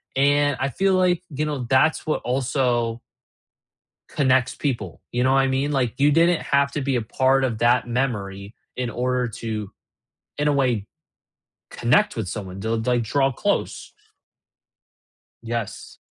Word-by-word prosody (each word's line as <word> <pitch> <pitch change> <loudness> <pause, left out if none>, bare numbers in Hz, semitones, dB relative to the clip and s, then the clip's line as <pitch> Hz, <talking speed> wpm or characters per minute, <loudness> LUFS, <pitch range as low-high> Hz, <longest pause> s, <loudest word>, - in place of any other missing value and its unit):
and 145 0 +3
I 135 - 0
feel 195 +8 +1
like, 180 -1 +2
you 150 0 -2
know, 145 -5 -3
that's 135 +4 +3
what 155 - -1
also 125 -2 0 1.1
connects 130 -3 +2
people, 135 -5 -3
you 120 - -1
know 130 +1 +3
what 135 - +4
I 135 - +3
mean? 135 +3 0
Like, 125 -3 0
you 145 +1 +4
didn't 170 +2 +4
have 140 0 +1
to 145 - -3
be 135 -1 0
a 120 - +1
part 130 +4 +2
of 120 -4 -1
that 120 +2 +2
memory 105 -5 -3 0.2
in 125 -1 -2
order 125 +1 -1
to, 110 -2 -5 0.7
in 150 0 +1
a - - +3
way, 125 -7 +1 0.8
connect 125 - +2
with 110 -5 -3
someone, 95 -1 -6
du 110 +3 -2
like, 120 +1 0
draw 135 +4 +1
close. 125 - -2 1.5
Yes. 115 -3 -5
130 Hz, 155 wpm, -23 LUFS, 115-140 Hz, 1.5 s, what